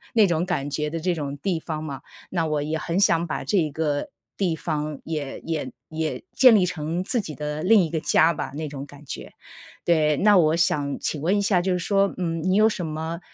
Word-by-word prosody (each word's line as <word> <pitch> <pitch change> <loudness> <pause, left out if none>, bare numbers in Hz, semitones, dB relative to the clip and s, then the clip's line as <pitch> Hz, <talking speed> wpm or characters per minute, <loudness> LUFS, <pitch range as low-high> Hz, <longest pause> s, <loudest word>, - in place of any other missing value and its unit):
那 220 -3 +6
种 170 -2 +1
感 160 -7 -1
觉 150 +1 -1
的 165 - -3
这 180 +2 0
种 145 -3 -4
地 175 +3 -1
方 155 -1 -4
嘛。 140 -3 -6 0.3
那 170 -3 0
我 150 -2 0
也 155 +2 -2
很 170 +3 -2
想 170 -4 +3
把 160 - -4
这 205 - +1
一 155 -4 +1
个 145 -1 -1 0.3
地 185 -5 0
方 150 -2 -3
也 150 -4 -4
也 155 -5 -3 0.2
也 160 0 -3
建 255 -3 +7
立 190 -4 +4
成 165 +1 -3
自 240 +4 +1
己 160 -7 -6
的 150 +1 -4
另 205 +2 +6
一 160 - -4
个 160 - -1
家 160 +2 +4
吧， - - -4
那 155 +1 -4
种 140 -1 -7
感 145 0 -14
觉。 - - -7 0.5
对， 155 -3 +3
那 210 0 +5
我 155 -2 +4
想 145 -4 +1
请 150 - -2
问 180 +6 +2
一 200 - +1
下， 195 -3 +3
就 185 +1 0
是 180 - +1
说， 195 +2 +1
嗯， 165 -3 -2
你 185 +2 +2
有 215 +1 +6
什 185 -5 -3
么 160 +2 -4
160 Hz, 245 characters per minute, -24 LUFS, 150-180 Hz, 0.5 s, 建